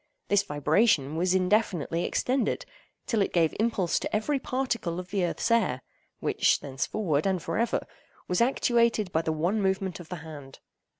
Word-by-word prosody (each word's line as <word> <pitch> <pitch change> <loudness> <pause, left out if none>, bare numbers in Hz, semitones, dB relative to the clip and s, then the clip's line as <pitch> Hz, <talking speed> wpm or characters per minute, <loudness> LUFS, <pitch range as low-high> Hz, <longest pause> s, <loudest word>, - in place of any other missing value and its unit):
This 205 0 +4
vibration 150 - +2
was 180 +3 +1
indefinitely 180 -3 +1
extended, 255 +1 0 0.4
till 225 -3 0
it 195 - 0
gave 165 -3 +2
impulse 210 -6 +1
to - - -3
every 275 +7 0
particle 235 -11 -2
of 180 0 -9
the 200 -3 0
earth's 175 +6 -1
air, 130 - +2 0.4
which - - +2
thenceforward, 145 +4 -1
and 190 -2 +1
for 165 - -3
ever, 235 - 0 0.4
was 180 +3 +1
actuated 235 -5 +2
by 160 - +1
the 160 - -1
one 175 +7 0
movement 190 -1 -1
of 175 - -11
the 180 - -4
hand. 145 -4 -10
185 Hz, 165 wpm, -27 LUFS, 160-220 Hz, 0.4 s, This